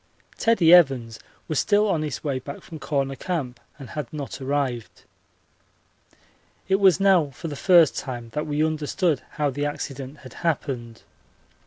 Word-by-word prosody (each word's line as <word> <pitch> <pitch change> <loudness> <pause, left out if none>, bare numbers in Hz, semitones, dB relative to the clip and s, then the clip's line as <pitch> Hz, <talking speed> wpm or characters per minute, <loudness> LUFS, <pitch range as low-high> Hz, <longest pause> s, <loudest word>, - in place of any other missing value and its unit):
Teddie 195 -8 +4
Evans 130 -10 +4 0.3
was 155 - 0
still 210 0 +3
on 170 -6 +1
his 150 -4 -4
way 140 -4 -1
back 140 +2 -9
from 160 -2 -10
Corner 135 -3 -1
Camp 135 -7 -4 0.2
and 135 -5 -10
had 150 -6 -5
not 145 -2 -6
arrived. 130 -4 -3 1.6
It 195 +1 +2
was 190 -2 +5
now 190 -6 +4
for 140 +5 -8
the 145 - -5
first 170 -1 +5
time 120 -3 -5
that 150 +6 -4
we 150 +1 +1
understood 155 0 0
how 150 -3 0
the 145 +2 -2
accident 140 -1 -6
had 130 - -10
happened. 130 -8 -3
145 Hz, 155 wpm, -24 LUFS, 130-165 Hz, 1.6 s, was